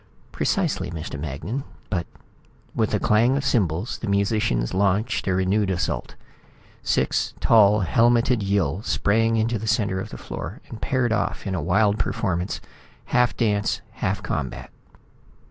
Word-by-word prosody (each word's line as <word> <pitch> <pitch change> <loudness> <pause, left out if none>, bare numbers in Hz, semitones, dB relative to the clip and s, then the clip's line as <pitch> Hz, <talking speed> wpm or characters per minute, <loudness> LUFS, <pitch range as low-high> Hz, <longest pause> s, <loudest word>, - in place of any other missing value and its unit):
"Precisely, - - 0
Mr. 80 -3 -6
Magnan. 80 - -4 0.3
But 85 -4 -1 0.4
" - - -32
With - - +1
a - - 0
clang 120 +5 +3
of 140 - -2
cymbals 95 -3 0
the 115 - -5
musicians 100 - +1
launched 100 +5 +1
a 95 - +2
renewed 95 +2 +1
assault. 90 -2 -2 0.7
Six - - 0
tall, 105 -2 +5
helmeted 115 +4 +3
Yill 95 -4 0
sprang 115 +1 +1
into 115 0 0
the 110 - -5
center 105 -3 +1
of - - -5
the - - -8
floor - - -7
and 115 - -9
paired 130 -3 +1
off 110 - -2
in 95 - -2
a 90 - -1
wild 100 +5 +2
performance, 90 -1 -1 0.5
half 125 0 +2
dance, 105 -3 +1
half 100 +1 -2
combat. 70 -7 -4
100 Hz, 145 wpm, -24 LUFS, 95-115 Hz, 0.7 s, tall